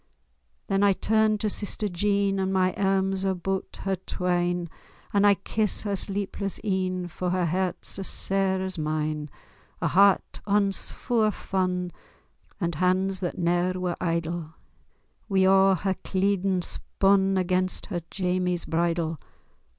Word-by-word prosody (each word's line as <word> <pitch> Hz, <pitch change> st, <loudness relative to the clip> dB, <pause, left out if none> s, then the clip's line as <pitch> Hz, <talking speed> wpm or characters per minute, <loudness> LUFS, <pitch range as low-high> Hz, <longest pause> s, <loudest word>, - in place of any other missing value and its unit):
Then 195 Hz, 0 st, 0 dB
I 200 Hz, -1 st, +5 dB
turn 215 Hz, +2 st, +2 dB
to 215 Hz, -, -2 dB
sister 210 Hz, +1 st, -1 dB
Jean, 200 Hz, +1 st, 0 dB
And 190 Hz, 0 st, 0 dB
my 185 Hz, -1 st, +2 dB
airms 195 Hz, -1 st, +1 dB
aboot 190 Hz, 0 st, -2 dB
her 195 Hz, 0 st, 0 dB
twine, 175 Hz, -1 st, -1 dB, 0.5 s
And 205 Hz, 0 st, +4 dB
I 200 Hz, -, +6 dB
kiss 210 Hz, +1 st, +1 dB
her 205 Hz, -2 st, -1 dB
sleepless 195 Hz, 0 st, -3 dB
een, 185 Hz, -3 st, -1 dB
For 180 Hz, +1 st, -4 dB
her 180 Hz, 0 st, +1 dB
heart's 185 Hz, +2 st, -1 dB
as 195 Hz, -, -1 dB
sair 190 Hz, -1 st, +1 dB
as 190 Hz, -3 st, -4 dB
mine,— 155 Hz, -1 st, -2 dB, 0.5 s
A -, -, 0 dB
heart 195 Hz, +1 st, +3 dB
ance 200 Hz, -1 st, +2 dB
fu' 235 Hz, -2 st, -1 dB
o' 215 Hz, -, +4 dB
fun, 180 Hz, -3 st, -2 dB, 0.7 s
And 170 Hz, -3 st, -1 dB
hands 185 Hz, +3 st, +1 dB
that 175 Hz, -2 st, -3 dB
ne'er 175 Hz, +1 st, +1 dB
were 180 Hz, -1 st, -1 dB
idle, 165 Hz, -1 st, -2 dB, 0.7 s
Wi' 190 Hz, -1 st, +3 dB
a' 195 Hz, 0 st, +5 dB
her 190 Hz, +2 st, -1 dB
cleedin' 190 Hz, -1 st, 0 dB
spun 195 Hz, +1 st, +1 dB
Against 185 Hz, 0 st, 0 dB
her 175 Hz, -4 st, -4 dB
Jamie's 180 Hz, -2 st, -1 dB
bridal. 165 Hz, -1 st, -1 dB
190 Hz, 140 wpm, -26 LUFS, 175-195 Hz, 0.7 s, I